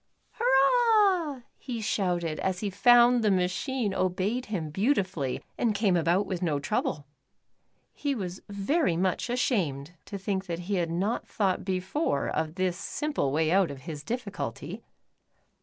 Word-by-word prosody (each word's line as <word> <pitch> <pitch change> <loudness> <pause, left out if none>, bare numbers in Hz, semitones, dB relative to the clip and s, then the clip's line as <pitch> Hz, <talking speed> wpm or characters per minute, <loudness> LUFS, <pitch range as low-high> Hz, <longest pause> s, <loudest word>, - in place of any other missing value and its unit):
" - - -42
Hurrah, 395 - +3
" - - -45
he 245 -4 -5
shouted 175 -7 -1
as 185 -1 -1
he 205 -2 -2
found 240 +4 +5
the 215 - +4
machine 195 +5 0
obeyed 190 +7 -1
him 170 -8 -3
beautifully 185 - 0 0.2
and 225 -4 +1
came 200 -3 +2
about 175 +4 +2
with 185 -3 -4
no 155 -5 0
trouble. 145 +1 -2 0.9
He 285 -2 -2
was 185 -4 -5
very 200 - +1
much 185 +5 0
ashamed 180 - 0
to 200 - -6
think 195 0 -3
that 170 0 -3
he 200 +1 0
had 170 -2 0
not 195 +8 -1
thought 195 -3 0
before 190 - -1
of 160 0 -2
this 185 -2 0
simple 295 - -2
way 155 +2 +1
out 190 -1 +4
of 140 -2 -8
his 150 +1 -7
difficulty. 230 - -5
195 Hz, 155 wpm, -28 LUFS, 175-240 Hz, 0.9 s, found